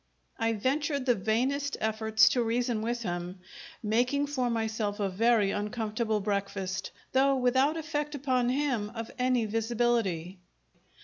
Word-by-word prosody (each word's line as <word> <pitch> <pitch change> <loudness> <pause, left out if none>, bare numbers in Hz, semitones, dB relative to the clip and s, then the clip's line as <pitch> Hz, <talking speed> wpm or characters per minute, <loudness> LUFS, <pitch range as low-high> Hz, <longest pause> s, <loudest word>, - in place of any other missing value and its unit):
I 225 0 +1
ventured 280 +5 -1
the 250 - +4
vainest 250 +7 0
efforts 220 0 +3
to 245 - +1
reason 235 -1 0
with 235 +1 -2
him, 175 -1 -4 0.4
making 245 +7 +1
for 260 -4 -1
myself 220 -2 -2
a 200 -1 0
very 215 +1 +3
uncomfortable 215 +1 -1
breakfast, 195 -2 -2 0.2
though 270 +1 +4
without 260 +4 +2
effect 300 -2 -3
upon 255 -3 +1
him 255 -6 0
of 225 0 -5
any 250 -2 +2
visibility. 220 -5 0
230 Hz, 130 wpm, -29 LUFS, 210-255 Hz, 0.4 s, the